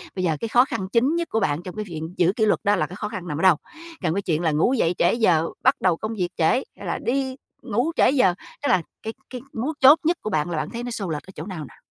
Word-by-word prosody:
Bây 185 - -2
giờ 160 -4 +1
cái 230 - -1
khó 245 +3 +5
khăn 225 -8 -4
chính 260 +8 +3
nhất 340 0 -2
của 225 - 0
bạn 150 -3 0
trong 180 - -8
cái 215 0 -4
viện 165 -2 -6
giữ 180 +2 +3
kỷ 220 - +2
luật 210 - +2
đó 205 +1 +3
là 155 -5 0
cái 185 - -9
khó 210 - -4
khăn 180 -1 -6
nằm 150 -1 -3
ở - - -2
đâu? 185 -4 +6 0.5
Còn 160 - +1
cái 200 - -1
chuyện 165 -4 -1
là 160 -3 +1
ngủ 160 - +2
dậy 180 -8 +1
trễ 175 - +3
giờ, 175 -9 +3 0.2
bắt 260 - +5
đầu 180 -3 +2
công 220 +3 -4
việc 180 -3 -1
trễ, 165 - +1
hay 245 -5 -3
là 170 - -2
đi 265 +1 0 0.3
ngủ 245 +6 0
trễ - - +5
giờ, 220 -10 +4 0.3
tức 285 - +1
là 185 -8 +4 0.2
cái 220 - -4 0.2
cái 250 -1 -7
mấu 260 +8 -2
chốt 280 +5 +8
nhất 340 +1 +2
của - - -3
bạn 155 +2 0
là 165 - -2
bạn 155 - -2
thấy 235 0 -5
nó 245 - -4
xô 200 -6 -4
lệch 150 -2 -3
ở 190 - -13
chỗ 155 - -6
nào 185 -5 -6
nào? 120 - -16
195 Hz, 305 wpm, -23 LUFS, 170-245 Hz, 0.5 s, chốt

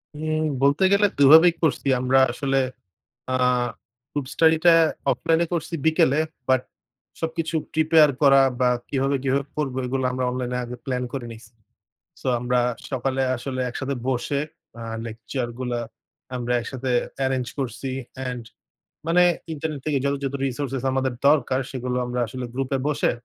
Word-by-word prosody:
উম 155 +1 -1 0.2
বলতে 140 +6 +3
গেলে 205 +1 +5
২ 140 -1 +6
ভাবেই 165 +2 +8
করছি। 150 -2 +1
আমরা 130 +1 +3
আসলে 135 +2 -1 0.8
আ - - 0 0.8
গ্রুপ 145 -3 -3
স্টাডি 160 0 +5
টা 170 - +8 0.4
অফলাইন 165 0 +1
এ - - -5
করছি 170 0 -2
বিকেলে। 155 -3 +3 0.3
বাট, 130 -1 +3 0.6
সবকিছু 165 0 -3 0.2
প্রিপেয়ার 155 -1 +5
করা 135 -1 +7 0.2
বা 125 - +4 0.2
কিভাবে 135 0 0
কিভাবে 135 +1 +1
করব 145 -4 -2
এইগুলা 130 +1 -1
আমরা 130 0 -1
অনলাইন 125 0 -3
এ - - -1
আগে 120 +1 -7
প্লান 125 -2 -2
করে 130 -3 -4
নিছি। 110 -1 -14 0.7
সো - - -5
আমরা 125 +1 +1 0.3
সকালে 135 0 -1
আসলে 130 +1 -5
একসাথে 135 +3 -3
বসে 135 +2 -1 0.4
আ - - -7 0.2
লেকচার 115 +3 -4
গুলা 125 -2 -2 0.6
আমরা 125 0 -2
একসাথে 130 +2 -5 0.4
এরেঞ্জ 130 -2 -1
করছি। 130 0 -4 0.3
অ্যান্ড 125 -2 -4 0.6
মানে 175 +2 +5 0.3
ইন্টারনেট 150 -1 -4
থেকে 150 -2 +1
যত, 140 - +1
যত 135 0 -2
রিসোর্সেস 135 -1 -3
আমাদের 130 -1 0
দরকার 130 -3 +3
সেগুলো 125 -1 -3
আমরা 125 0 -3
আসলে 125 +2 -5
গ্রুপ 130 0 -2
এ - - -4
বসে, 150 - +1
135 Hz, 155 wpm, -23 LUFS, 125-150 Hz, 0.8 s, ভাবেই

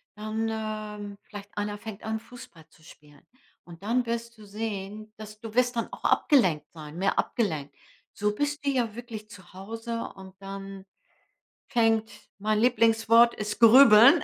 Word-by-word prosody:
dann, 215 +1 -3
ähm, 215 -2 -5
vielleicht 205 0 -11
einer 205 0 -2
fängt 210 -1 -9
an, 220 0 -2
Fußball 220 -9 -14
zu 155 0 -24
spielen. 145 -2 -18 0.4
Und 170 0 -13
dann 240 +3 +1
wirst 235 0 -4
du 210 - -13
sehen, 210 0 -6
dass 215 0 -10
du 225 -2 -8
wirst 250 0 +2
dann 230 - -2
auch - - -10
abgelenkt 185 - +3
sein 155 0 -10
mehr 195 +1 0
abgelenkt. 155 - -2 0.4
So 210 0 -1
bist 290 +2 -2
du - - +2
ja 240 -5 0
wirklich 225 -3 -8
zu 185 -3 -14
Hause 225 +4 -5
und 190 0 -12
dann 195 0 -8 0.8
fängt 225 -3 +2 0.3
mein 215 +1 +1
Lieblingswort 230 -1 +4
ist 210 +1 -4
Grübeln, 240 +4 +8
215 Hz, 155 wpm, -27 LUFS, 195-230 Hz, 0.8 s, Grübeln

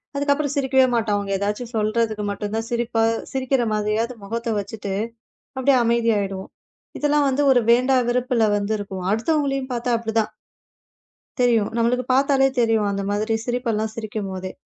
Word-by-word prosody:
அதுக்கப்புறம் 285 0 0
சிரிக்கவே 265 -1 +3
மாட்டோம். 220 -3 +1
அவுங்க 200 -1 -3
எதாச்சும் 210 +4 -3
சொல்றதுக்கு 215 0 0
மட்டும்தான் 210 +3 -3
சிரிப்பா 235 -1 0 0.3
சிரிக்குற 260 -1 0
மாதிரியாவது 215 +3 -1
முகத்தை 230 +2 -3
வச்சிட்டு, 200 -1 -5 0.6
அப்படியே 265 0 +3
அமைதியாயிடுவோம். 215 -5 0 0.5
இதெல்லாம் 295 -1 +2
வந்து 280 +2 +1
ஒரு 245 - +4
வேண்டா 255 +2 +4
வெறுப்புல 245 -2 +1
வந்திருக்கும். 200 -2 -3
அடுத்தவங்களையும் 275 +2 0
பாத்தா 240 +1 -1
அப்படி 225 -1 -4
தான். 215 0 -5 1.1
தெரியும்! 230 -4 +3
நம்மளுக்கு 240 +2 +1
பாத்தாலே 270 0 +4
தெரியும். 225 -3 +2
அந்த 200 0 -2
மாதிரி 215 +2 0
சிரிப்பு 245 -1 -1
எல்லாம் 220 0 -2
சிரிக்கும்போதே! 195 -4 -5
230 Hz, 135 wpm, -22 LUFS, 210-255 Hz, 1.1 s, ஒரு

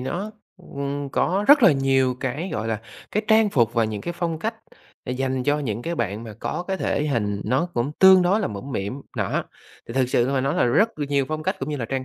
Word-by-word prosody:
nó, 175 +11 -4 0.3
ừm, 140 -5 -5
có 190 +8 0
rất 285 -3 +8
là 180 - +8
nhiều 135 -2 +2
cái, 140 +8 -3
gọi 110 +1 -2
là, 110 -2 -2 0.3
cái 210 - 0
trang 220 -1 +5
phục 120 - +2
và 115 -1 +3
những 110 -2 -4
cái 175 - -4
phong 170 -2 -3
cách 225 +7 -2 0.5
để 125 - -3
dành 130 0 -1
cho 145 +3 +1
những 120 -5 -3
cái 170 +1 -3
bạn 110 - -2
mà 110 -2 -9
có 175 - -3
cái 190 - 0
thể 150 -4 -1
hình 105 -7 -1
nó 130 +10 +1
cũng 120 +5 -1
tương 190 -1 +8
đối 195 +5 +2
là 205 - 0
mũm 105 +7 -7
mĩm, 100 +6 -3 0.2
nó - - -1 0.4
thì 115 - -6
thực 130 -2 +2
sự 120 0 +2
mà 135 - +1
nói 135 +3 0
là 180 - +2
rất 205 - +2
là 145 - -2
nhiều 140 -1 +2
phong 155 0 -3
cách, - - -1
cũng 135 - -4
như 150 - -2
là 120 - -3
trang 130 +2 -3
140 Hz, 255 wpm, -23 LUFS, 120-175 Hz, 0.5 s, rất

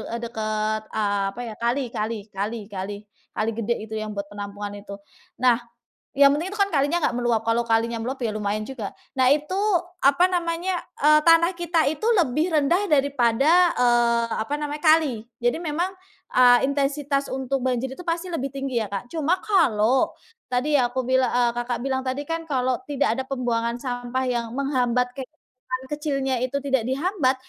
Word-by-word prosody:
eee, 235 - -5
deket, 215 -1 -2 0.2
eee, 205 -2 +1
apa 195 +5 -7
ya, 230 - -6
kali 240 +4 +1
kali 220 +2 -2 0.2
kali 205 +4 -3
kali 195 +1 -4 0.4
kali 215 +1 0
gede 230 +1 -1
itu 220 0 -8
yang 215 0 -4
buat 200 - -2
penampungan 205 0 -6
itu. 200 0 -9 0.5
Nah, 245 -1 +5 0.6
yang 280 0 +7
penting 325 +6 -2
itu 420 - -7
kan 400 0 +3
kalinya 290 +4 +2
nggak - - 0
meluap, 240 -2 +1
kalau 230 +1 +2
kalinya 230 0 +1
meluap 260 +4 -3
ya 220 - -1
lumayan 210 0 -2
juga. 240 -7 -5 0.2
Nah 260 -1 +3
itu 300 +5 +1 0.5
apa 280 +6 +5
namanya, 355 0 -1 0.2
eee, 305 +1 +5
tanah 335 +3 +5
kita 345 -2 +1
itu 290 +7 -2
lebih 315 +1 +2
rendah 315 +3 +2
daripada, 280 +4 +4
eee, 240 -1 +3 0.2
apa 250 +6 -4
namanya 295 0 -4
kali. 305 -8 +3 0.2
Jadi 240 +3 +1
memang, 345 +3 -2 0.4
eee, 245 0 +6
intensitas 280 0 -1
untuk 265 0 -2
banjir 260 0 -1
itu - - -9
pasti 335 +1 -2
lebih 275 -4 -2
tinggi 270 -1 -4
ya, - - -5
Kak. 200 +4 -4
Cuma 325 +3 +1
kalau 260 - +3 0.4
tadi 255 +5 0
ya 250 -4 +3
aku 260 - -2
bilang 260 0 +3
eee, 240 -1 +2
Kakak 240 0 -2
bilang 265 -1 0
tadi 260 +2 -2
kan 330 0 -2
kalau 255 -2 +1
tidak 275 -6 +1
ada 265 - -2
pembuangan 240 -2 -1
sampah 245 0 -3
yang 240 -2 -1
menghambat 250 -2 0
kayak 265 -2 -7
bangunan 255 0 -8
kecilnya 275 -3 -1
itu 275 +2 -1
tidak 270 -3 0
dihambat, 290 -2 +1
260 Hz, 175 wpm, -24 LUFS, 235-295 Hz, 0.6 s, yang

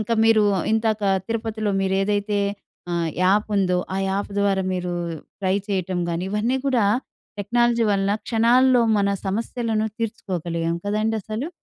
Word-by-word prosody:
ఇంకా 215 +2 0
మీరు 225 -1 +5 0.3
ఇందాక 220 -1 +1 0.2
తిరుపతిలో 220 -2 -2
మీరు 190 0 0
ఏదైతే 205 0 0 0.5
ఆహ్, 170 -1 0
యాప్ 205 +4 +3
ఉందో 180 -2 +2 0.2
ఆ - - -1
యాప్ 200 +1 -2
ద్వారా 195 -1 +2
మీరు 180 -1 -2 0.5
ట్రై 190 0 +1
చేయటం 185 -2 -1
గాని 170 +2 -2
ఇవన్నీ 220 +5 0
కూడా 250 -6 +2 0.6
టెక్నాలజీ 240 +2 +2
వలన 200 0 +1
క్షణాల్లో 245 +2 +4 0.2
మన 200 - +2 0.2
సమస్యలను 220 +2 -1
తీర్చుకోగలిగాం 170 -7 -2
కదండీ 215 +2 0
అసలు. 220 - -4
210 Hz, 135 wpm, -23 LUFS, 190-225 Hz, 0.6 s, మీరు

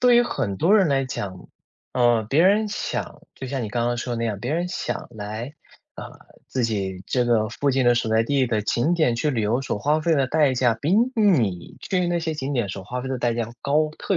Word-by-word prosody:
对 245 -1 +5
于 240 - +6
很 110 - -2
多 190 - +4
人 190 -5 +4
来 135 -1 +1
讲， 100 -7 -6 0.4
嗯， 120 -3 +2
别 150 +7 +3
人 210 +3 +3
想 205 - -4
就 135 - -7
像 130 -1 -3
你 110 - -3
刚 120 +2 -1
刚 120 0 0
说 120 0 -3
的 115 - -4
那 115 - -1
样， 105 -3 -2
别 125 +7 -3
人 175 +2 -1
想 185 - -4
来， 110 +6 -6 0.4
啊， - - -8 0.4
自 130 -2 -1
己 95 -4 -2
这 125 -2 +1
个， 110 -3 +2
附 140 +4 -1
近 130 -1 +1
的 120 0 +5
所 115 -2 -1
在 110 +1 +3
地 135 +1 +1
的 110 -2 0
景 120 +10 +1
点 155 -8 +2
去 150 +5 0
旅 120 - -1
游 115 +5 0
所 115 - -3
花 150 +7 +1
费 165 +1 +2
的 135 -3 +2
代 150 0 +2
价， 120 -2 +2
比 145 +10 -2 0.2
你 120 - +1
去 180 -2 -1
那 175 0 0
些 160 -1 -2
景 140 -1 -4
点 120 -7 0
所 95 0 -6
花 125 +4 -4
费 130 - -5
的 130 -1 -2
代 120 -1 0
价 115 -1 -3
高 150 +2 +2
特 195 - 0
125 Hz, 265 characters per minute, -23 LUFS, 115-155 Hz, 0.4 s, 于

